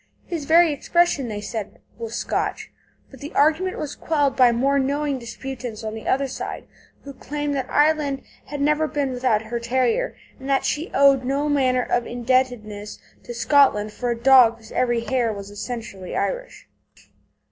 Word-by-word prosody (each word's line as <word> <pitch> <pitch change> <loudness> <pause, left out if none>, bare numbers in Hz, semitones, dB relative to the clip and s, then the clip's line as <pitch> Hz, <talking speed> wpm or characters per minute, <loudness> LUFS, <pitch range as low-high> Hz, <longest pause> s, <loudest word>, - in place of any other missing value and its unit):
His 330 -5 -4
very 325 +1 +5
expression, 310 -2 +1
they 210 -2 -5
said, 215 -1 -6 0.2
was 230 0 -5
Scotch. - - -2 0.4
But 270 - -13
the 290 +1 -9
argument 320 +6 +2
was 290 -1 -4
quelled 290 -4 0
by 250 -2 +6
more 275 +4 +2
knowing 280 0 -1
disputants 240 -1 -7
on 215 0 -4
the 220 -1 -8
other 275 +1 +1
side, 265 - -6 0.4
who 280 - -9
claimed 290 +2 -4
that 270 -2 -3
Ireland 295 -2 +2 0.2
had 290 -1 -5
never 300 +2 +2
been 285 -3 -1
without 245 -4 +1
her 235 +2 -4
terrier, 255 - 0 0.2
and 265 +1 -7
that 270 -1 +2
she 310 +4 -1
owed 275 -1 +5
no 275 +3 0
manner 255 -3 +2
of 240 0 -1
indebtedness 240 -4 -1 0.3
to 240 - -6
Scotland 230 -4 +3
for 245 +2 -3
a 235 - -1
dog 240 -2 +6
whose 220 -1 -16
every 240 -2 +1
hair 240 -1 0
was 200 -1 -8
essentially 205 -4 -6
Irish. - - -3
260 Hz, 170 wpm, -23 LUFS, 235-290 Hz, 0.4 s, by